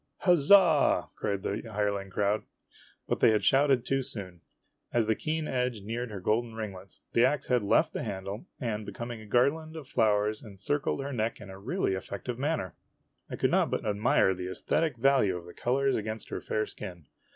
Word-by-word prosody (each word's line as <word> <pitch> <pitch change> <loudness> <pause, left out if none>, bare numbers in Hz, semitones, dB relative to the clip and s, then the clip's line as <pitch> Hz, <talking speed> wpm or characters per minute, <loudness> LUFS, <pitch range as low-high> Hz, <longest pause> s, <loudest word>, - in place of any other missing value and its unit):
" - - -52
Huzza! 175 -2 +5
" - - -44
cried 100 -2 -2
the 100 +3 -2
hireling 100 -1 -1
crowd. 100 +2 +1 0.7
But - - -1
they - - +6
had 110 -1 +2
shouted 135 -2 +4
too 135 +1 +1
soon. 95 -8 -6 0.5
As 120 -2 +2
the 110 - +2
keen 155 +6 -2
edge 125 -4 -1
neared 115 +3 -3
her 105 -2 -6
golden 110 +4 0
ringlets, 100 -4 -7
the 115 - +4
ax 140 +2 +2
head 125 -2 +3
left 100 - +2
the - - -3
handle 100 - -5
and 110 -4 -2
becoming 120 +1 -6
a 110 - -12
garland 155 +8 +1
of 155 -5 -8
flowers 105 -3 +1
encircled 120 +8 -2
her 140 +1 -4
neck 115 -1 -1
in 100 -2 -10
a 95 - -10
really 130 - -1
effective 100 +6 -5
manner. 140 - -1 0.6
I - - -4
could - - +1
not - - +3
but - - -2
admire 105 -2 +3
the 90 0 -5
esthetic 150 - -1
value 120 -7 +3
of 85 - -10
the 90 - -11
colors 135 +2 +1
against 110 +1 -4
her - - -4
fair 110 0 -1
skin. 85 -4 -9
110 Hz, 195 wpm, -29 LUFS, 100-135 Hz, 0.7 s, they